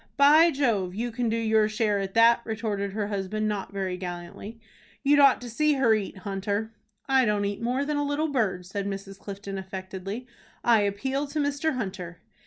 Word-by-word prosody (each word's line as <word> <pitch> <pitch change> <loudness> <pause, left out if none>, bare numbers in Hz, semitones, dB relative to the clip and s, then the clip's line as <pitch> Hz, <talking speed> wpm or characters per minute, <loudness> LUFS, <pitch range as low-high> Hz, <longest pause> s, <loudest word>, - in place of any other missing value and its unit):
"By 300 +4 +7
Jove! 225 - 0
you 235 +3 -2
can 240 0 -1
do 225 - 0
your 220 -1 +2
share 215 -1 +1
at 195 +1 -4
that," 230 +1 +6
retorted 210 -3 -3
her 205 -1 -2
husband 210 +2 -2
not 205 -2 -3
very 190 -2 -3
gallantly. 180 +5 -7 0.4
"You'd 290 +1 +5
ought 275 -2 +6
to 245 - -7
see 300 +6 +2
her 265 -5 +3
eat, 205 -2 -2
Hunter." 200 +3 -3 0.4
"I 265 -1 +4
don't 210 -2 +1
eat 200 +1 -3
more 250 +4 0
than 300 0 -1
a 290 - +1
little 290 +2 0
bird," 210 -10 0
said 200 +2 -4
Mrs. 195 0 -6
Clifton, 195 -1 -6
affectedly. 190 +4 -6 0.4
"I 230 -3 +5
appeal 265 +8 -1
to 305 +2 -3
Mr. 285 +1 0
Hunter." 185 -7 -5
215 Hz, 190 wpm, -26 LUFS, 195-255 Hz, 0.4 s, By